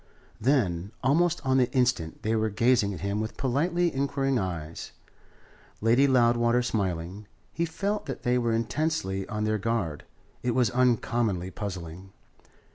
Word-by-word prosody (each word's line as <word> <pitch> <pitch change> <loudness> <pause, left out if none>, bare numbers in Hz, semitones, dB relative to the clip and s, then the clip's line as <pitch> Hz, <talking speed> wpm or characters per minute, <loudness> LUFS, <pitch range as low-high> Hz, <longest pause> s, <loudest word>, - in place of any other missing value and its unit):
Then, 105 -8 +1
almost 155 +4 +2
on 130 0 +3
the 125 -1 +2
instant, 125 -11 0
they 110 +1 +1
were 110 0 +1
gazing 115 -1 +2
at 95 - -7
him 100 +2 -1
with 110 - -5
politely 170 +7 +1
inquiring 135 -1 0
eyes, 85 -4 -5 0.9
Lady 120 +6 +4
Loudwater 120 -1 +3
smiling. 95 -3 -3 0.3
He 170 - 0
felt 200 +4 -3
that 135 - -5
they 125 0 +2
were 120 -1 0
intensely 115 -5 -1
on 105 -2 -3
their 110 0 0
guard. 100 -9 -2 0.4
It 120 -1 -1
was 125 -5 +3
uncommonly 120 -6 +1
puzzling. 95 -1 -7
115 Hz, 140 wpm, -27 LUFS, 100-130 Hz, 0.9 s, Lady